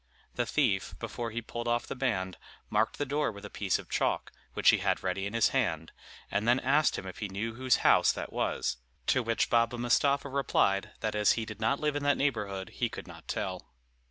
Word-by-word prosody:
The 120 Hz, -1 st, -1 dB
thief, 115 Hz, -11 st, +1 dB
before 120 Hz, -1 st, -4 dB
he 115 Hz, +1 st, -4 dB
pulled 120 Hz, +1 st, -5 dB
off 120 Hz, 0 st, +1 dB
the -, -, -5 dB
band, 95 Hz, -9 st, -1 dB, 0.3 s
marked 110 Hz, +2 st, +1 dB
the 145 Hz, -, -1 dB
door 145 Hz, -1 st, 0 dB
with 100 Hz, -1 st, -10 dB
a 105 Hz, -, -9 dB
piece 100 Hz, -3 st, 0 dB
of -, -, -10 dB
chalk, -, -, 0 dB, 0.2 s
which -, -, +6 dB
he -, -, +2 dB
had -, -, 0 dB
ready 95 Hz, +1 st, -1 dB
in 105 Hz, -, -6 dB
his 115 Hz, -, +4 dB
hand, 80 Hz, -12 st, -1 dB, 0.4 s
and 105 Hz, +3 st, 0 dB
then 120 Hz, +2 st, +5 dB
asked 145 Hz, +4 st, +3 dB
him -, -, -6 dB
if 95 Hz, -, -8 dB
he 105 Hz, -, -3 dB
knew 110 Hz, +4 st, -3 dB
whose 130 Hz, +1 st, +2 dB
house -, -, +6 dB
that -, -, -6 dB
was; 65 Hz, -, -1 dB, 0.3 s
to 130 Hz, -, +3 dB
which 115 Hz, -1 st, 0 dB
Baba 120 Hz, 0 st, +3 dB
Mustapha 140 Hz, +4 st, +2 dB
replied, 130 Hz, -8 st, +1 dB
that 110 Hz, -1 st, -1 dB
as 105 Hz, -1 st, +4 dB
he 115 Hz, -, -2 dB
did 110 Hz, 0 st, -9 dB
not 135 Hz, +6 st, +2 dB
live 150 Hz, -1 st, 0 dB
in 145 Hz, -, -1 dB
that 145 Hz, 0 st, +2 dB
neighborhood 105 Hz, -9 st, -1 dB
he -, -, -2 dB
could -, -, -8 dB
not -, -, -13 dB
tell. 95 Hz, -9 st, -4 dB
115 Hz, 220 wpm, -30 LUFS, 100-130 Hz, 0.4 s, which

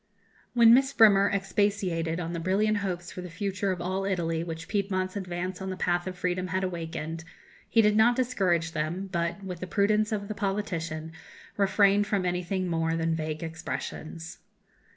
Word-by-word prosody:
When 230 Hz, -1 st, +8 dB
Miss 265 Hz, +2 st, +4 dB
Bremer 200 Hz, -3 st, +6 dB
expatiated 195 Hz, -4 st, 0 dB
on 170 Hz, -1 st, -4 dB
the 170 Hz, -, -3 dB
brilliant 205 Hz, +5 st, +1 dB
hopes 180 Hz, -3 st, -3 dB
for 180 Hz, -, -7 dB
the 180 Hz, -, -7 dB
future 195 Hz, +2 st, -2 dB
of 180 Hz, -, -3 dB
all 185 Hz, +2 st, -2 dB
Italy 170 Hz, -4 st, -1 dB
which 165 Hz, -1 st, -6 dB
Piedmont's 190 Hz, -2 st, -1 dB
advance 185 Hz, -1 st, -4 dB
on 190 Hz, -, -4 dB
the 185 Hz, -, -4 dB
path 175 Hz, 0 st, 0 dB
of 185 Hz, -1 st, -5 dB
freedom 180 Hz, +1 st, -1 dB
had 185 Hz, +1 st, -1 dB
awakened, 165 Hz, -2 st, -4 dB, 0.5 s
he 225 Hz, -, +4 dB
did 210 Hz, 0 st, +4 dB
not 230 Hz, +3 st, +5 dB
discourage 190 Hz, -10 st, +1 dB
them, 165 Hz, +5 st, -3 dB
but, 170 Hz, +2 st, -2 dB
with 180 Hz, -3 st, -6 dB
the 185 Hz, -, -5 dB
prudence 210 Hz, +3 st, +2 dB
of 200 Hz, -2 st, -2 dB
the 215 Hz, -, -3 dB
politician, 180 Hz, -6 st, -3 dB, 0.4 s
refrained 200 Hz, 0 st, +3 dB
from 195 Hz, -3 st, 0 dB
anything 180 Hz, +1 st, -1 dB
more 165 Hz, -1 st, 0 dB
than 165 Hz, 0 st, 0 dB
vague 155 Hz, 0 st, -3 dB
expressions. 165 Hz, 0 st, -6 dB
185 Hz, 170 wpm, -28 LUFS, 170-200 Hz, 0.5 s, When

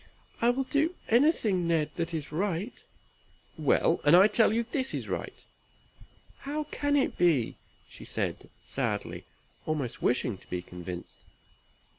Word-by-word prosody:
"I 235 Hz, -, +5 dB
will 260 Hz, +2 st, +1 dB
do 305 Hz, +6 st, 0 dB
anything, 225 Hz, -, +3 dB
Ned, 160 Hz, -3 st, +1 dB
that 170 Hz, -1 st, -2 dB
is 155 Hz, -4 st, -4 dB
right." 190 Hz, +5 st, -1 dB, 0.8 s
"Well! -, -, +2 dB
and 145 Hz, +3 st, +7 dB
I 185 Hz, +2 st, +8 dB
tell 215 Hz, 0 st, +4 dB
you 230 Hz, +2 st, +1 dB
this 260 Hz, +3 st, -1 dB
is -, -, -4 dB
right." -, -, -5 dB, 1.0 s
"How 295 Hz, +2 st, -3 dB
can 290 Hz, 0 st, 0 dB
it 280 Hz, -, +1 dB
be?" 160 Hz, -10 st, +2 dB, 0.3 s
said -, -, -3 dB
she, -, -, -18 dB
sadly, -, -, -3 dB, 0.4 s
almost 145 Hz, -6 st, -2 dB
wishing 120 Hz, -5 st, +1 dB
to -, -, -20 dB
be 90 Hz, -1 st, -3 dB
convinced. 90 Hz, 0 st, -8 dB
185 Hz, 140 wpm, -29 LUFS, -, 1.0 s, I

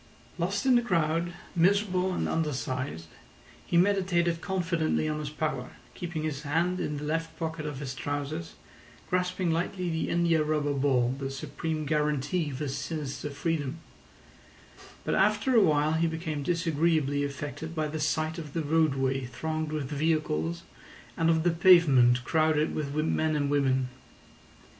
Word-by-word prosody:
Lost 195 Hz, +5 st, -1 dB
in 260 Hz, -, +5 dB
the 240 Hz, -, +5 dB
crowd, 170 Hz, -5 st, 0 dB, 0.2 s
miserable 185 Hz, +1 st, +2 dB
and 180 Hz, -, -1 dB
undersized, 130 Hz, -, -2 dB, 0.6 s
he 170 Hz, -, 0 dB
meditated 175 Hz, -3 st, +2 dB
confidently 170 Hz, -4 st, 0 dB
on 150 Hz, 0 st, -2 dB
his 150 Hz, -1 st, -4 dB
power, 150 Hz, -4 st, -3 dB, 0.2 s
keeping 170 Hz, -3 st, -4 dB
his 150 Hz, -3 st, -3 dB
hand 170 Hz, +5 st, 0 dB
in 150 Hz, -, -2 dB
the 145 Hz, -, -6 dB
left 165 Hz, +2 st, -2 dB
pocket 160 Hz, -2 st, -3 dB
of 145 Hz, -2 st, -5 dB
his 135 Hz, -2 st, -5 dB
trousers, 145 Hz, +5 st, -4 dB, 0.6 s
grasping 180 Hz, -1 st, 0 dB
lightly 175 Hz, +2 st, -1 dB
the 160 Hz, -, -1 dB
india 170 Hz, -2 st, +2 dB
rubber 150 Hz, -1 st, 0 dB
ball, 130 Hz, -3 st, +2 dB
the 135 Hz, -1 st, -3 dB
supreme 155 Hz, +3 st, -4 dB
guarantee 150 Hz, +2 st, 0 dB
of 135 Hz, -, -5 dB
his 140 Hz, -1 st, -3 dB
sinister 150 Hz, -2 st, -4 dB
freedom; 150 Hz, 0 st, -2 dB, 1.3 s
but -, -, 0 dB
after 215 Hz, +6 st, +2 dB
a 225 Hz, -, +7 dB
while 155 Hz, -4 st, +3 dB
he 165 Hz, +1 st, +2 dB
became 160 Hz, -2 st, -3 dB
disagreeably 160 Hz, -3 st, +1 dB
affected 145 Hz, +3 st, -5 dB
by 155 Hz, -1 st, 0 dB
the 155 Hz, +1 st, -4 dB
sight 155 Hz, +2 st, 0 dB
of 150 Hz, -4 st, -8 dB
the 165 Hz, -, -1 dB
roadway 135 Hz, -4 st, +1 dB
thronged 155 Hz, +5 st, -3 dB
with 155 Hz, -2 st, -2 dB
vehicles 145 Hz, -, 0 dB, 0.5 s
and 165 Hz, 0 st, +2 dB
of 160 Hz, -1 st, +3 dB
the 175 Hz, -, +3 dB
pavement 145 Hz, -9 st, +6 dB
crowded 155 Hz, -1 st, +2 dB
with 145 Hz, -2 st, -3 dB
men 155 Hz, -1 st, +1 dB
and 145 Hz, -1 st, 0 dB
women. 130 Hz, -3 st, +2 dB
155 Hz, 150 wpm, -28 LUFS, 145-170 Hz, 1.3 s, a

